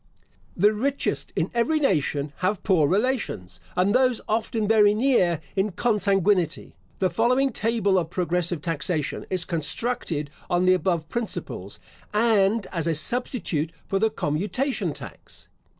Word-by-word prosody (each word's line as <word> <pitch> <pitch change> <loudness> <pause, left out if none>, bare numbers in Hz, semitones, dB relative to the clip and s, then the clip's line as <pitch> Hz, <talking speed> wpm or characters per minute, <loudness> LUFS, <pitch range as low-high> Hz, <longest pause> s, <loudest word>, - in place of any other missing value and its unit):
The 205 +4 +4
richest 270 +6 -1
in - - -1
every 275 +7 +2
nation 145 - 0
have 185 +2 -1
poor 170 -7 +3
relations, 190 - -1 0.2
and 185 +3 +2
those 255 -2 +3
often 220 0 -1
very 210 -1 +5
near 210 - +2
in 195 0 0
consanguinity. 195 -5 +1 0.2
The 185 -2 +1
following 250 +8 +2
table 210 -4 +1
of 165 -2 -3
progressive 175 -2 -1
taxation 155 -2 -2
is 180 -3 0
constructed 170 -3 -2 0.2
on 175 0 +2
the 185 - +6
above 175 -3 0
principles, 235 +6 -4 0.4
and 215 -1 +3
as 170 -3 -2
a 165 - +1
substitute 170 - -1
for 195 - -1
the 220 +2 +3
commutation 210 - -1
tax. - - -10
195 Hz, 135 wpm, -25 LUFS, 170-230 Hz, 0.4 s, the